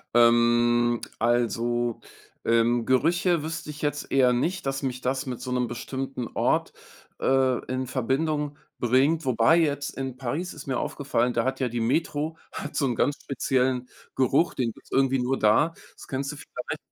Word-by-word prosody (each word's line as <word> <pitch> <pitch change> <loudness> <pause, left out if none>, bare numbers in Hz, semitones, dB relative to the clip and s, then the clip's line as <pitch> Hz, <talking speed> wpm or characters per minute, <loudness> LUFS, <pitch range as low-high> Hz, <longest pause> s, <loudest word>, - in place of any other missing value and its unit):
Ähm, 120 0 +4 0.2
also, 120 0 +1 0.5
ähm, 115 +1 +3
Gerüche 170 +5 +2
wüsste 160 -1 -5
ich 150 0 -8
jetzt 145 -1 -2
eher 130 -2 +4
nicht, 170 +9 -1
dass 135 +1 -1
mich 130 -1 -3
das 130 +3 -1
mit 125 -3 -5
so 130 - -5
'nem 125 -1 +1
bestimmten 130 0 -4
Ort, - - +1 0.5
äh, 130 -1 +2
in 130 0 -3
Verbindung 145 +4 -1 0.2
bringt, 135 +7 +2
wobei 130 +5 +4
jetzt 145 -4 +1
in 130 -2 -4
Paris 145 +8 -3
ist 145 -2 -10
mir 130 -2 0
aufgefallen, 125 -4 -1
da 115 - +1
hat 130 +1 -1
ja 130 - +1
die 120 0 -3
Metro 150 +5 0
hat 150 - -6
so 140 - +2
'nen 120 - -1
ganz 145 +5 +1
speziellen 130 -2 0 0.3
Geruch, 135 +6 +2
den 120 -3 -1
gibt's - - -19
irgendwie 135 -1 +2
nur 130 +2 0
da. 110 +10 +3 0.2
Das - - -13
kennst 135 +1 -3
du - - -8
vielleicht. 125 -3 -6
130 Hz, 170 wpm, -26 LUFS, 120-145 Hz, 0.5 s, Ähm